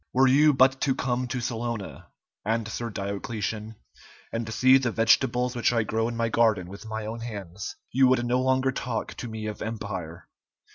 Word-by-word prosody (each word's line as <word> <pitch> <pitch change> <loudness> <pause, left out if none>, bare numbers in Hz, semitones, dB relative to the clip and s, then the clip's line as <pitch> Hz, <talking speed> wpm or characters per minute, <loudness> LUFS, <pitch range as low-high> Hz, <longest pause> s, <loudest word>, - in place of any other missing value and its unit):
"Were 130 +1 +5
you 150 +4 +6
but 135 0 +4
to 135 -2 +2
come 125 0 -1
to 125 +1 -3
Salona," 115 -3 -4 0.4
answered 115 +1 -2
Diocletian, 105 +2 -4 0.6
"and 115 -1 -3
see 130 +4 +5
the 125 -2 0
vegetables 125 +2 +2
which 120 - +2
I 115 -2 +2
grow 110 +1 0
in 120 -1 -4
my 115 0 +1
garden 110 -6 +2
with 100 +3 -10
my 110 0 -4
own 110 +2 -5
hands, 100 -5 -6 0.2
you 130 0 +5
would 125 -1 +3
no 125 +1 +1
longer 130 0 +2
talk 125 -3 -3
to 120 - -5
me 110 -1 -6
of 105 -1 -5
empire." 100 -7 -5
115 Hz, 180 wpm, -26 LUFS, 110-125 Hz, 0.6 s, you